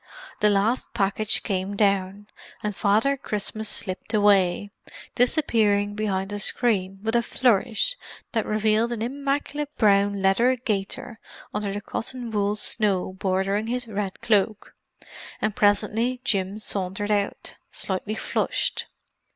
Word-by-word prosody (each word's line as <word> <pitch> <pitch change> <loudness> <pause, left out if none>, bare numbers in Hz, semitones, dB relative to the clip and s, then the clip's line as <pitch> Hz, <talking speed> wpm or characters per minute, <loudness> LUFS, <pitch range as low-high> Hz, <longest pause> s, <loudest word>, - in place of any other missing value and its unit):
The 210 - +4
last 210 +5 +1
package 200 +2 +1
came 195 +1 -2
down, 200 0 +1 0.4
and 210 -1 -2
Father 220 +8 +3
Christmas 215 -3 -3
slipped 200 +3 -4
away, 200 -1 +3 0.4
disappearing 220 -6 +2
behind 200 -2 -2
a 205 - -3
screen 195 -4 +1
with 225 +1 0
a 235 - +5
flourish 240 - +1 0.4
that 225 -3 -1
revealed 215 +2 +2
an 225 -2 -3
immaculate 280 +3 -2
brown 200 -2 +3
leather 230 +7 +4
gaiter 225 -1 -3 0.3
under 210 -1 -2
the 205 +1 -4
cotton 240 +3 -5
wool 205 -1 +1
snow 205 -3 0
bordering 190 +3 0
his 245 +1 -2
red 200 -3 -4
cloak; 210 -1 +1 0.7
and 215 -1 -1
presently 215 +4 +2
Jim 195 -5 0
sauntered 205 0 -2
out, 205 -1 -1 0.2
slightly 205 +3 -2
flushed. - - -1
210 Hz, 125 wpm, -25 LUFS, 200-230 Hz, 0.7 s, a